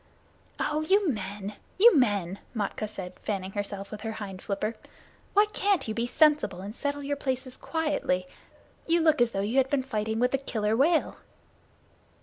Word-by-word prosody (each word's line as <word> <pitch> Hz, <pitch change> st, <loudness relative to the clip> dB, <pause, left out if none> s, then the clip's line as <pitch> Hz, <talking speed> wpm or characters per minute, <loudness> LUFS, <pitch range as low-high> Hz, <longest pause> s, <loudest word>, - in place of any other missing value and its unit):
"Oh, 300 Hz, +1 st, 0 dB
you 390 Hz, +5 st, +3 dB
men, 205 Hz, -3 st, -4 dB, 0.2 s
you 435 Hz, +1 st, +8 dB
men!" 200 Hz, -, +2 dB, 0.2 s
Matkah 215 Hz, 0 st, -2 dB
said, 185 Hz, -3 st, -8 dB
fanning 195 Hz, -3 st, -3 dB
herself 200 Hz, 0 st, -5 dB
with 215 Hz, -, -7 dB
her 225 Hz, 0 st, -3 dB
hind 195 Hz, -3 st, -7 dB
flipper. 210 Hz, +2 st, -2 dB, 0.6 s
"Why 415 Hz, +1 st, +7 dB
can't 400 Hz, -, +1 dB
you 220 Hz, -, -2 dB
be 235 Hz, +2 st, -1 dB
sensible 295 Hz, -, +3 dB
and 205 Hz, +3 st, -7 dB
settle 285 Hz, +1 st, -3 dB
your 285 Hz, +1 st, -1 dB
places 260 Hz, -1 st, -3 dB
quietly? 295 Hz, -, -1 dB, 0.6 s
You 340 Hz, +1 st, +4 dB
look 315 Hz, -4 st, +4 dB
as 240 Hz, -, +5 dB
though 195 Hz, -4 st, -2 dB
you 215 Hz, +6 st, -1 dB
had 265 Hz, 0 st, +4 dB
been 275 Hz, -2 st, +1 dB
fighting 220 Hz, -3 st, -2 dB
with 250 Hz, +1 st, +2 dB
the 270 Hz, -, +1 dB
Killer 220 Hz, -5 st, -1 dB
Whale." 310 Hz, +6 st, +2 dB
230 Hz, 170 wpm, -28 LUFS, 205-285 Hz, 0.6 s, you